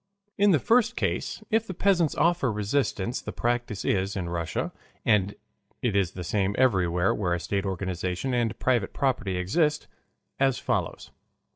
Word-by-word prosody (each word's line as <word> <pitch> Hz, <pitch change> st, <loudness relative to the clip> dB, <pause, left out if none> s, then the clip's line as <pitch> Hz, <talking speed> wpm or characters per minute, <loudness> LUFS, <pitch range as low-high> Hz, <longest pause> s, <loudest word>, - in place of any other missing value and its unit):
In 205 Hz, +1 st, +4 dB
the 175 Hz, -, +5 dB
first 235 Hz, -, +3 dB
case -, -, -2 dB
if 225 Hz, +1 st, +2 dB
the 185 Hz, -, -5 dB
peasants 180 Hz, -5 st, +2 dB
offer 170 Hz, -7 st, +2 dB
resistance 105 Hz, +1 st, -1 dB
the -, -, -6 dB
practice 120 Hz, -3 st, -2 dB
is 95 Hz, +1 st, 0 dB
in 90 Hz, -3 st, -3 dB
Russia, 85 Hz, -1 st, -2 dB, 0.3 s
and 100 Hz, -3 st, +2 dB, 0.5 s
it 115 Hz, -5 st, +1 dB
is 95 Hz, -2 st, +1 dB
the 90 Hz, -, -6 dB
same 100 Hz, +2 st, 0 dB
everywhere 95 Hz, -7 st, +3 dB
where 90 Hz, -4 st, 0 dB
a -, -, -3 dB
state 100 Hz, +3 st, -2 dB
organization 95 Hz, +5 st, -2 dB
and 120 Hz, -2 st, 0 dB
private 120 Hz, -6 st, +1 dB
property 120 Hz, -10 st, 0 dB
exist, 150 Hz, -, +1 dB, 0.5 s
as 135 Hz, -2 st, +3 dB
follows. -, -, -2 dB
105 Hz, 155 wpm, -27 LUFS, 95-140 Hz, 0.5 s, the